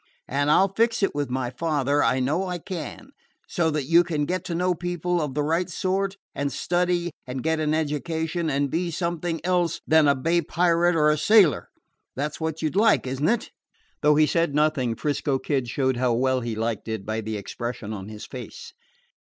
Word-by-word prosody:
And 145 +2 0
I 150 - +6
'll 195 0 -1
fix 230 -1 +2
it 195 - +2
with 145 -2 -2
my 125 -1 -2
father 145 0 0
I 125 +3 +2
know 155 +9 0
I 180 -1 -3
can 170 -3 -7 0.4
so 165 -2 0
that 150 -2 -1
you 170 +6 +5
can 155 -4 -1
get 185 +3 -2
to 170 - -3
know 180 +1 +1
people 175 0 -2
of 145 -3 -3
the 150 - +1
right 165 +4 0
sort, 195 +3 -1 0.2
and 140 0 -2
study 175 +3 0 0.2
and 125 0 -5
get 160 0 +1
an 155 0 +1
education, 160 +2 -2
and 140 -1 0
be 175 +2 -1
something 170 0 -2
else 175 -2 +1
than 160 -1 +5
a 140 - +4
bay 165 +6 +1
pirate 170 +1 +2
or 150 -1 +4
a 150 - 0
sailor. 180 - +4 0.5
That 145 +3 -2
's - - -10
what 160 0 -3
you 155 - +1
'd - - -14
like, 215 -4 +4
is 130 +1 -4
n't 155 - +3
it?" 235 0 -1 0.5
Though 150 0 +4
he 155 +1 +5
said 160 -1 0
nothing, 150 -6 +1
'Frisco 145 -1 -1
Kid 130 -2 -1
showed 130 +1 0
how 125 -1 +1
well 130 +2 +1
he 115 -2 -3
liked 110 -1 -3
it 110 -3 -4
by 110 +1 -2
the 110 0 -4
expression 110 +2 -5
of 95 -2 -7
his 105 -1 -8
face. 470 -1 -9
155 Hz, 210 wpm, -25 LUFS, 130-175 Hz, 0.5 s, I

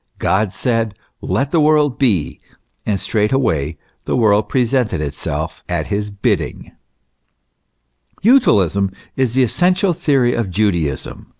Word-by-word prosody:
God 100 0 +1
said, 115 -2 -1 0.3
Let 140 +2 -1
the 165 - +3
world 150 -3 +3
be, 105 - +1 0.5
and 100 -2 0
straightway 105 - 0 0.3
the - - -1
world 105 -3 +2
presented 125 - +1
itself 75 +1 -4
at - - -1
His 105 +1 -2
bidding, 100 -1 -2
t - - -19 1.6
Utilism 100 - +3 0.2
is 130 -3 0
the 130 - +4
essential 180 - +2
theory 140 -7 +1
of 115 -5 -2
Judaism. 85 -8 -2
110 Hz, 120 wpm, -18 LUFS, 95-135 Hz, 1.6 s, the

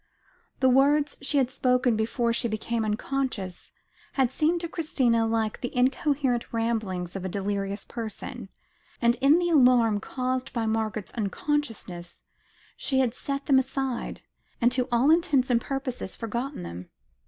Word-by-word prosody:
The 260 - +5
words 285 +3 +4
she 280 +1 0
had 260 -2 +2
spoken 250 -2 +2
before 230 +2 0
she 235 +1 0
became 225 +1 -2
unconscious, 215 -3 -3 0.4
had 265 -3 +2
seemed 320 +5 +1
to 340 - -3
Christina 255 -9 +1
like 225 -1 -1
the 245 0 -4
incoherent 260 -1 +1
ramblings 215 -6 -2
of 195 - -4
a 190 - -2
delirious 200 +1 -3
person, 225 -3 -7 0.5
and 235 0 +4
in 280 +4 +6
the 350 0 +1
alarm 245 -7 +5
caused 255 +3 -3
by 230 -3 -1
Margaret's 220 -2 -2
unconsciousness, 215 - -3 0.5
she 265 - -1
had 255 -3 +2
set 275 +2 -4
them 270 -2 +5
aside, 265 -1 -3 0.4
and 240 0 +4
to 250 0 +1
all 245 +5 +4
intents 290 -7 +3
and 235 -1 +3
purposes 265 -7 -4
forgotten 240 +5 -4
them. 85 +2 -8
245 Hz, 145 wpm, -27 LUFS, 220-270 Hz, 0.5 s, in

